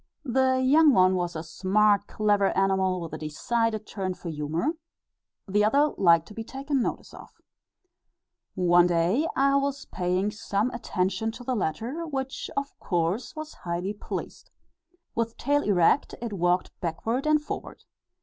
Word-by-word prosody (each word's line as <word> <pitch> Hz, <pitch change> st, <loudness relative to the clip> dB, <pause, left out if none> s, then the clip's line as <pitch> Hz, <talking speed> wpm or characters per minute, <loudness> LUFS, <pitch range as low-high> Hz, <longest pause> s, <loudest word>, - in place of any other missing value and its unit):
The 260 Hz, 0 st, +2 dB
young 300 Hz, +2 st, +6 dB
one 185 Hz, 0 st, +5 dB
was 175 Hz, -2 st, -2 dB
a 160 Hz, -, -4 dB
smart 200 Hz, +5 st, +2 dB
clever 205 Hz, -2 st, +2 dB
animal 190 Hz, -1 st, +2 dB
with 165 Hz, -, -7 dB
a -, -, -5 dB
decided 220 Hz, +8 st, -1 dB
turn 190 Hz, -3 st, -4 dB
for 180 Hz, -1 st, -7 dB
humour, 160 Hz, -, -1 dB, 0.8 s
the 205 Hz, +2 st, +2 dB
other 285 Hz, +8 st, +3 dB
liked 170 Hz, -3 st, +4 dB
to -, -, -10 dB
be 225 Hz, -, -5 dB
taken 270 Hz, +3 st, -2 dB
notice -, -, -4 dB
of. -, -, -12 dB, 1.3 s
One 175 Hz, -1 st, +5 dB
day 175 Hz, -, +2 dB
I 275 Hz, +1 st, +3 dB
was 280 Hz, 0 st, -2 dB
paying 185 Hz, +3 st, -1 dB
some 210 Hz, +3 st, -1 dB
attention 200 Hz, -2 st, -1 dB
to 240 Hz, +2 st, -10 dB
the 255 Hz, -, -1 dB
latter, 235 Hz, -, -2 dB
which, 270 Hz, -3 st, -4 dB
of 280 Hz, 0 st, -2 dB
course, 175 Hz, -, -1 dB
was 310 Hz, 0 st, -7 dB
highly 175 Hz, +3 st, -4 dB
pleased. 205 Hz, -, -7 dB, 0.6 s
With 230 Hz, 0 st, -2 dB
tail 290 Hz, 0 st, +1 dB
erect, 200 Hz, -, +2 dB
it 230 Hz, -3 st, -5 dB
walked 180 Hz, -1 st, +1 dB
backward 225 Hz, -, -2 dB
and 305 Hz, 0 st, +4 dB
forward. 300 Hz, -, -7 dB
210 Hz, 150 wpm, -26 LUFS, 180-260 Hz, 1.3 s, young